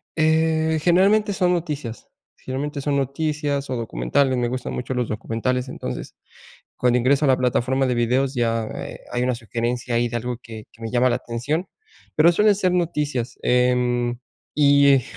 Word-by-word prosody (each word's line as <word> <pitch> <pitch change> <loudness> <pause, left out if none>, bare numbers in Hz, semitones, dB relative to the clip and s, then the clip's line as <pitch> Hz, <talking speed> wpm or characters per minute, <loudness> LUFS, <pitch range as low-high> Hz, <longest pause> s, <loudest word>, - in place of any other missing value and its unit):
Eh, 160 0 +2
generalmente 200 +5 +3
son 180 -2 +2
noticias, 150 -9 -4 0.3
generalmente 140 +2 -4
son 140 0 0
noticias 140 +1 -2
o 130 - -1
documentales, 115 - 0
me 120 - 0
gustan 125 +1 -4
mucho 125 +1 -4
los 125 -2 -1
documentales. 125 +4 -2
Entonces, - - -6 0.6
cuando 125 0 +2
ingreso 140 +4 +3
a - - +2
la 130 - +4
plataforma 130 +1 +1
de 125 -1 0
videos 125 +3 +1
ya, 115 -3 0
eh, - - -7
hay 125 - 0
una 125 0 0
sugerencia 120 +1 -3
ahí 120 +1 +2
de 120 - -2
algo 120 0 -4
que 110 -2 -10
que 115 - -21
me 115 - -5
llama 125 +1 +3
la 120 - +1
atención, 130 +9 -3 0.5
pero 165 +3 +6
suelen 210 +3 +4
ser 185 -2 +1
noticias, 150 -8 -1
em, 125 -1 +1 0.3
y 140 -1 +5
e 130 - +3
130 Hz, 170 wpm, -22 LUFS, 120-150 Hz, 0.6 s, pero